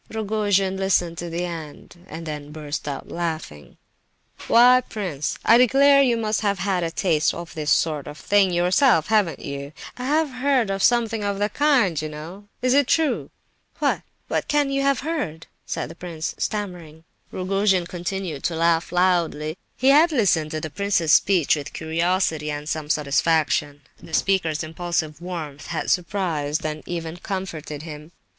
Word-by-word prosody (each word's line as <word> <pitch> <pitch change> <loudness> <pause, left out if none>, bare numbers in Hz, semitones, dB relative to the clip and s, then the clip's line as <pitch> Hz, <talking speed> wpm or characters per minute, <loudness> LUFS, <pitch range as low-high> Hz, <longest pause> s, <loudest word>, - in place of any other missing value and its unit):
'" - - -34
Rogojin 205 -3 0
listened 180 -3 +1
to 175 - -5
the 170 +2 -2
end, 170 +1 -9
and 165 +1 -8
then 150 -2 -6
burst 150 -1 -5
out 140 -2 -5
laughing: 160 - -5 0.7
"Why, 250 +2 +6
prince, 175 -9 -3
I 230 +1 +7
declare 275 +3 +6
you 245 -4 +3
must 215 -1 -1
have 200 -2 0
had 190 -1 0
a 165 - -1
taste 165 -2 +1
of 170 0 -8
this 155 -3 -3
sort 150 -3 +1
of 150 0 -8
thing 200 +1 +3
yourself—haven't 180 - +2
you? 140 +1 -6 0.2
I 250 - -5
have 300 +1 +1
heard 255 -3 +1
tell 195 - -1
of - - -6
something 230 -2 +2
of 200 -1 -1
the 205 +1 0
kind, 245 - +2
you 155 - -4
know; 165 +7 -9 0.2
is 255 0 +3
it 280 -2 +4
true?" 320 0 +1 0.5
"What? - - 0 0.3
What - - -1
can 290 -1 +1
you 275 0 0
have 275 -1 +1
heard?" 260 - -3 0.2
said - - -3
the - - -10
prince, 165 -2 -5
stammering. 175 -7 -4 0.3
Rogojin 190 -1 +1
continued 175 -3 -4
to 170 - 0
laugh 165 0 +1
loudly. 175 -4 +1 0.2
He 260 - +3
had 310 +5 +6
listened 185 - +2
to 155 - -3
the 155 - -5
prince's 195 -4 +1
speech 180 -7 +4
with 145 -2 -7
curiosity 160 -1 0
and 150 0 -5
some 155 -2 -3
satisfaction. 150 -1 +1 0.2
The 160 - -4
speaker's 170 -5 +1
impulsive 160 -1 -3
warmth 160 -5 -6
had 170 - -2
surprised 165 -5 -1
and 155 0 -3
even 170 -1 -4
comforted 170 -6 -5
him. 155 0 -9
175 Hz, 165 wpm, -23 LUFS, 155-205 Hz, 0.7 s, I